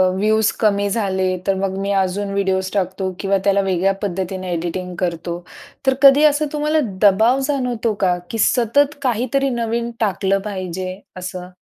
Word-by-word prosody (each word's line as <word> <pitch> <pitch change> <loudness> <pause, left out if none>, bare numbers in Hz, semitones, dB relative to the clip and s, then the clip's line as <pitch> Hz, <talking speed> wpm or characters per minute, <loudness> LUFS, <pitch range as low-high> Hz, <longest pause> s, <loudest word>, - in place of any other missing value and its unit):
Views 215 +2 +2
कमी 205 -2 +2
झाले 190 -3 0 0.2
तर 195 - +3
मग 190 0 -2
मी 200 +1 -2
अजून 195 +2 -2
व्हिडिओज 190 -1 0
टाकतो 190 -1 -1
किंवा 195 0 +1
त्याला 200 0 +3
वेगळ्या 190 +1 +2
पद्धतीने 185 -1 -3
एडिटिंग 175 +2 -4
करतो. 170 -1 -3 0.5
तर 265 - +5
कधी 280 +2 +8
असं 300 0 +3
तुम्हाला 300 +1 +1 0.2
दबाव 220 +6 +4
जाणवतो 250 -6 -1
का? 180 -1 +2
की 225 - -4
सतत 275 +7 +2
काहीतरी 260 +2 0
नवीन 235 +1 -2
टाकलं 195 -2 +1
पाहिजे 185 0 -5 0.2
असं? 180 0 -6
200 Hz, 150 wpm, -19 LUFS, 185-235 Hz, 0.5 s, कधी